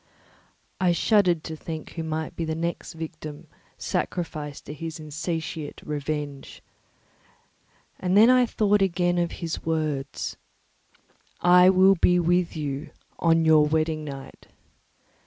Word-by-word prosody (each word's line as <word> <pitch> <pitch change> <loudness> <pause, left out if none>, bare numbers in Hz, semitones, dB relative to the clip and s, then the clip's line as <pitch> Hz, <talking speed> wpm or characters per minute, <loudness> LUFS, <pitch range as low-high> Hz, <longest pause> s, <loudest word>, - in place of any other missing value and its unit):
I 180 -2 +3
shuddered 180 -3 +3
to 160 - -6
think 160 0 -7
who 165 - -5
might 160 -1 -4
be 165 - -3
the 160 -1 -2
next 170 +1 -4
victim 155 -2 -8 0.3
sacrificed 150 -5 -3
to - - -7
his 160 +2 -6
insatiate 155 0 -5
revenge. 145 -1 -5 1.4
And 185 +1 +1
then 220 +2 +8
I 250 -1 +5
thought 210 -2 +2
again 175 -2 +1
of 170 -1 -1
his 165 -2 -5
words—"_I 160 +3 -1
will 190 +1 +6
be 180 +1 +4
with 175 0 +1
you 145 -1 -4 0.3
on 165 -1 +3
your 155 -1 +6
wedding 155 0 0
night. 135 -2 -9
160 Hz, 120 wpm, -25 LUFS, 155-175 Hz, 1.4 s, then